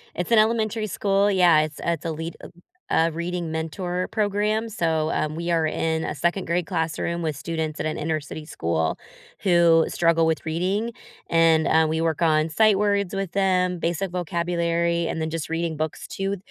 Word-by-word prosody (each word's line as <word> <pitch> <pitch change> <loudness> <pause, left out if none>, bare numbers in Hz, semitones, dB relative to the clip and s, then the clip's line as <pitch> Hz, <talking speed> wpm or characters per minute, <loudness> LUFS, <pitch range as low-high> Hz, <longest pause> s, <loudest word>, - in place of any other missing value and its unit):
It's 180 +5 -3
an 230 - +6
elementary 220 0 +1
school, 200 0 +1
yeah, 175 -5 +5
it's 155 -1 -4
it's 170 -2 -1
a 165 - -1
lead 160 +1 -5
um, - - -11 0.4
a 165 +1 +2
reading 170 0 -3
mentor 175 +3 -3
program, 215 +1 0
so, 160 -6 0
um, 155 0 -1
we 170 +1 -2
are 165 -1 +2
in 160 0 -1
a - - -3
2nd 175 +5 0
grade 170 +1 0
classroom 165 +2 -2
with 155 -3 -2
students 160 +1 -3
at - - -3
an 155 - -2
inner 155 0 -1
city 150 +1 -8
school 80 - -1 0.4
who 170 -3 +5
struggle 165 -1 +2
with 160 0 -1
reading. 190 +8 -1 0.4
And, 165 -1 +4
ah, 160 0 +4
we 160 +1 -1
work 165 0 -1
on 155 -1 +3
sight 210 +5 +3
words 200 -2 +1
with 195 -3 -3
them, 185 -2 +1
basic 170 +3 -1
vocabulary, 170 -1 0
and - - -3
then 160 - -1
just 165 -1 -4
reading 165 0 -2
books 155 0 -4
to 195 +1 -2
170 Hz, 185 wpm, -24 LUFS, 160-185 Hz, 0.4 s, an